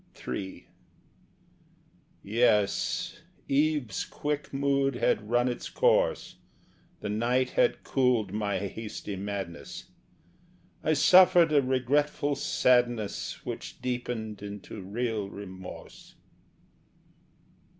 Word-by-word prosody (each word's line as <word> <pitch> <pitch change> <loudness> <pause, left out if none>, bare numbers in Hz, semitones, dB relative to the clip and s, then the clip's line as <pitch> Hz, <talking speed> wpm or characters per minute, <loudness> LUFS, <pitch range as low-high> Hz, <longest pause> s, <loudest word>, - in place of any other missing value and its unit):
III 95 -1 -5 1.6
Yes, 105 -1 +1 0.3
eve's 145 -7 +1
quick 150 0 -4
mood 140 -1 +1
had 105 -3 0
run 120 +1 +3
its 120 - -3
course, - - +1 0.6
The - - -3
night 125 +4 +1
had - - +2
cooled 125 -7 +1
my 105 -2 -1
hasty 105 +1 -5
madness; 95 -3 -6 0.9
I 155 - +2
suffered 175 +1 +6
a 145 - +6
regretful 140 +3 +1
sadness 120 -6 +1
Which - - -6
deepened 120 -4 -4
into 105 +1 -8
real 105 +1 -2
remorse. 95 -2 -10
120 Hz, 90 wpm, -28 LUFS, 100-135 Hz, 1.6 s, suffered